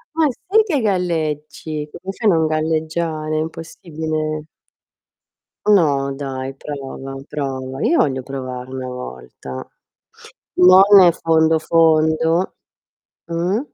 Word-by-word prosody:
Ma 320 -2 +3
sì 385 - +2
che 320 -10 0
galleggi! 155 -5 -2
Come 190 +2 -7
fai 220 -1 +1
a - - +4
non 160 -1 +2
galleggiare? 155 0 -1
È - - +1
impossibile. 155 -1 -4 1.2
No, 145 -9 +3
dai, 135 -1 -5
prova 135 -2 -7
prova. 135 -2 -4
Io 335 - +2
voglio 130 -2 +1
provare 130 -1 -6
una 130 -1 -5
volta. 65 - -8 0.9
Non 185 +1 +8 0.2
nel 180 -3 +7
fondo, 160 -1 +2
fondo. 160 +2 +2 0.7
Mh? 175 +6 -1
155 Hz, 110 wpm, -19 LUFS, 135-170 Hz, 1.2 s, Non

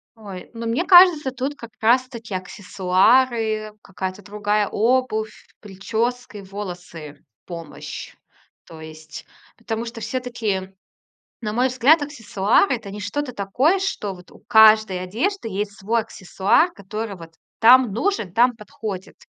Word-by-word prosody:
Ой, 200 -5 -10
ну, 230 0 -6
мне 275 +11 0
кажется, 350 -7 +7
тут 265 +3 -4
как 235 -4 -11
раз 250 +3 +3
таки 230 -5 -9
аксессуары, 215 +4 +1
какая-то 190 +1 -6
другая 205 +1 -1
обувь, 220 -2 -1
причёски, 220 +3 -3
волосы, 175 -6 -9 0.2
помощь. 165 -3 -8 0.5
То 160 -1 -13
есть, 155 -1 -11 0.3
потому 230 0 -4
что 230 0 -8
всё-таки, 220 -8 -3 0.7
на 210 -2 -3
мой 250 +3 +2
взгляд, 260 +5 +4
аксессуар- 230 - +1
это 225 -5 -3
не 205 +1 -8
что-то 255 +7 -3
такое, 250 - +1
что 370 - -3
вот 180 0 -16
у - - -17
каждой 215 -4 +5
одежды 235 - -2
есть 205 +1 -3
свой 225 +4 0
аксессуар, 220 - +1
который 210 +1 -6
вот 165 -2 -13 0.2
там 240 -2 +6
нужен, 230 - -1
там 245 +1 +3
подходит. 210 -3 -7
220 Hz, 130 wpm, -22 LUFS, 195-245 Hz, 0.7 s, кажется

